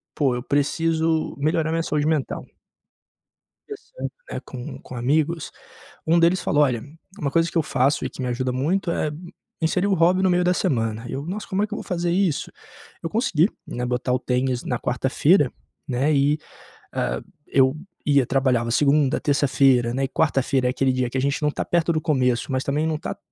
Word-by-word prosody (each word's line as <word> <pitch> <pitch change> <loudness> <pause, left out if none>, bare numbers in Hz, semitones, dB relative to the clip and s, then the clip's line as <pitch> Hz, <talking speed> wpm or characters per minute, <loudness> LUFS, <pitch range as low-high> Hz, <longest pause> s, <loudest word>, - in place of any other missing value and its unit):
"Poxa, 135 -4 +2
eu 125 - -4
preciso 160 +3 0
melhorar 155 +2 +1
minha 165 0 0
saúde 150 -1 0
mental.". 155 -4 -1 1.2
Conversando, 430 +4 -7 0.2
né, - - -4
com 125 -2 -8
com - - -10
amigos 155 +6 0 0.6
um 170 +2 +4
deles 170 +2 +3
falou: 145 0 +2
"Olha, 120 -4 -1 0.4
uma 140 -6 -1
coisa 165 +2 +2
que - - -12
eu - - +3
faço 135 +1 +1
e - - -3
que - - -10
me 125 - -2
ajuda 125 +1 -1
muito 170 +8 0
é, 155 - 0
hum, 170 +4 -9 0.3
inserir 180 +4 +1
o 200 - +2
hobby 180 +2 +3
no 190 - +3
meio 180 0 +2
da 180 - +3
semana.", 115 - -1
eu: 140 +2 -4
"Nossa, 205 +4 -4
como 195 +2 0
é - - +2
que 215 - -22
eu - - -3
vou - - -6
fazer 175 -3 -1
isso?". 180 -4 0 0.5
Eu 165 - -2
consegui, 195 - +2 0.2
né, 125 0 -3
botar 125 +1 -1
o 125 - +2
tênis 125 0 -1
na 125 - -1
quarta-feira, 135 - +2 0.4
né, 135 +4 +1
e, 145 +2 +3 0.6
ah, - - -1 0.3
eu 130 0 +3 0.3
ia 140 -3 +4
trabalhava 125 -3 +1
segunda, 145 +2 +3
terça-feira, 135 -4 +3
né, 135 - -1
eh, - - -3
quarta-feira 135 -3 +1
é - - +2
aquele 130 +1 +1
dia 125 -1 0
que 130 - -3
a - - +1
gente 140 +2 0
não 150 -1 +2
tá - - -3
perto 170 -1 +1
do 155 - 0
começo, 130 -4 +1
mas 130 0 0
também 150 +3 0
não 155 - -1
tá 160 - -5
145 Hz, 200 wpm, -23 LUFS, 130-165 Hz, 1.2 s, um